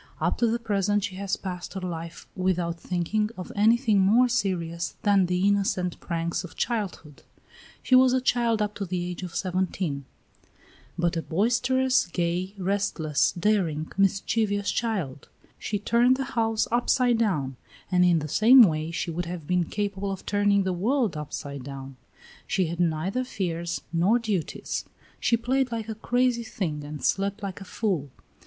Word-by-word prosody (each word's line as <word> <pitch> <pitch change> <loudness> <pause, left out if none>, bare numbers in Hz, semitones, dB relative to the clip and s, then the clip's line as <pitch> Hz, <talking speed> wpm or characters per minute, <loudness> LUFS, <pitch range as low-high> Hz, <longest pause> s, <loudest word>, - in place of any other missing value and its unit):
Up - - +1
to 235 - +3
the 230 +1 +1
present 205 -3 0
she 200 -1 -3
has 195 0 -1
passed 180 -1 -6
her - - -2
life 170 -2 -6
without 175 -2 -1
thinking 185 +5 -1
of 185 - -7
anything 220 0 +4
more 220 +7 +5
serious 175 -8 -1
than 200 -3 +4
the 180 +2 +1
innocent 195 -3 0
pranks 170 -1 -2
of 180 - -10
childhood; 200 - -3 0.6
she - - 0
was 255 0 +7
a 260 - +3
child 235 -3 +1
up 210 0 -3
to 205 - -5
the 175 -1 -3
age 180 - -7
of 180 -2 -7
seventeen, 180 -6 -2 0.9
but 175 0 +1
a 165 - 0
boisterous, 245 +8 +2
gay, 175 +3 -2
restless, 185 -6 0
daring, 175 -5 0
mischievous 200 +1 +1
child; 185 - -3 0.3
she 205 - -2
turned 235 +5 +3
the 270 - -1
house 225 -1 +1
upside 245 0 +2
down, 150 - 0 0.4
and 180 -1 +4
in 175 -2 +5
the 155 -1 -2
same 235 - +7
way 155 -4 +1
she 170 +1 -3
would 175 +2 -3
have 170 -3 -6
been 180 +1 +1
capable 200 +1 -3
of 195 - -6
turning 205 -1 +2
the 190 -1 -1
world 225 - +1
upside 145 -2 -6
down; 135 0 -8 0.5
she 190 - +1
had 170 +1 -5
neither 175 +8 0
fears 170 -8 -3
nor 180 +8 +3
duties; 210 -8 -3 0.4
she 235 - +2
played 260 +2 0
like 225 -2 -3
a 220 - -3
crazy 245 +2 +1
thing 160 -9 -4
and 150 0 -6
slept 200 +2 0
like 195 -1 -5
a - - -8
fool. 180 -10 -2
195 Hz, 165 wpm, -26 LUFS, 170-220 Hz, 0.9 s, was